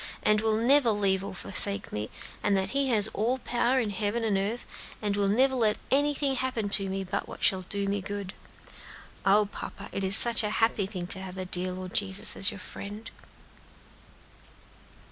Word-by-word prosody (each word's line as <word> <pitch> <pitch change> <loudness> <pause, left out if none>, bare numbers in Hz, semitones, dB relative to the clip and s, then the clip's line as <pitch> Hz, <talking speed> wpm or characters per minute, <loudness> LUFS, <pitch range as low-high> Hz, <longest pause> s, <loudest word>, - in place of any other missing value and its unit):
_ - - -6 0.2
and 210 0 +2
will 220 -1 +1
never 250 +2 +4
leave 200 -3 +1
nor 195 - -7
forsake 200 +2 -1
me; 105 +1 -4 0.3
and 200 -1 +1
that 190 0 -2
He 275 0 +1
has 215 -3 +3
all 225 +4 -1
power 245 +1 0
in 220 -4 -2
heaven 210 +3 -2
and 215 -3 0
in 195 +2 0
earth, 240 - -8 0.3
and 205 -2 -2
will 200 -1 0
never 260 +7 +2
let 220 -4 +1
anything 285 0 +1
happen 255 -5 -2
to 195 -1 +2
me 195 0 -3
but 190 +2 -4
what - - -10
shall 190 -1 +3
do 200 -1 -2
me 200 0 -2
good. 200 -1 -6 0.9
O 205 +2 +4
papa, 200 0 -9
it 195 - -4
is 190 +1 +7
such 235 -1 +7
a 210 - -2
happy 225 -3 +1
thing 185 -4 -6
to 190 +1 -3
have 190 -1 -8
the 185 -1 -5
dear 180 0 +4
Lord 185 0 -8
Jesus 200 +1 0
for - - -10
your 200 +1 +3
friend!" 205 +4 -9
205 Hz, 200 wpm, -27 LUFS, 195-230 Hz, 0.9 s, is